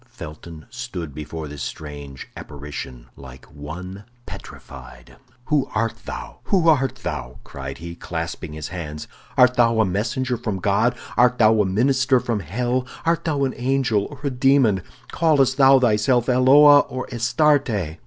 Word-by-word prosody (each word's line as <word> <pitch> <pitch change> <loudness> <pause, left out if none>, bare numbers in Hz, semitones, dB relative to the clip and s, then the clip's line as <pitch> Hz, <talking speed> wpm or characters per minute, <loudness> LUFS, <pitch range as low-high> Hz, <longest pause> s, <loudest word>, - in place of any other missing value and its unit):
Felton 80 +1 -10
stood 105 - -6
before 75 +1 -7
this 75 -1 -8
strange 70 -3 -8
apparition 70 -4 -8
like 65 -2 -13
one 90 +7 -9 0.2
petrified. - - -12 0.3
"Who 145 -2 0
art 115 +1 0
thou? - - -7
Who 180 -4 +2
art 135 -5 +2
thou?" - - -5
cried 65 0 -8
he, 85 +1 -8
clasping 85 -1 -6
his 75 -1 -6
hands. 75 -4 -7 0.3
"Art 125 0 +6
thou 115 -2 +3
a 110 - +4
messenger 120 +7 -2
from 110 -4 -3
God; 100 +5 +1 0.2
art 125 0 +4
thou 110 -1 +4
a - - +1
minister 130 +6 +2
from 120 -3 -2
hell; 120 - -2 0.2
art 165 0 +1
thou 145 -4 0
an 130 - 0
angel 125 -5 0
or 145 -2 -12
a 140 - -1
demon; 125 -6 +3 0.3
callest 140 -5 +2
thou 135 -1 +7
thyself 120 +1 +2
Eloa 140 +3 +7
or 130 -2 -4
Astarte?" 115 - +1
115 Hz, 150 wpm, -22 LUFS, 80-130 Hz, 0.3 s, thou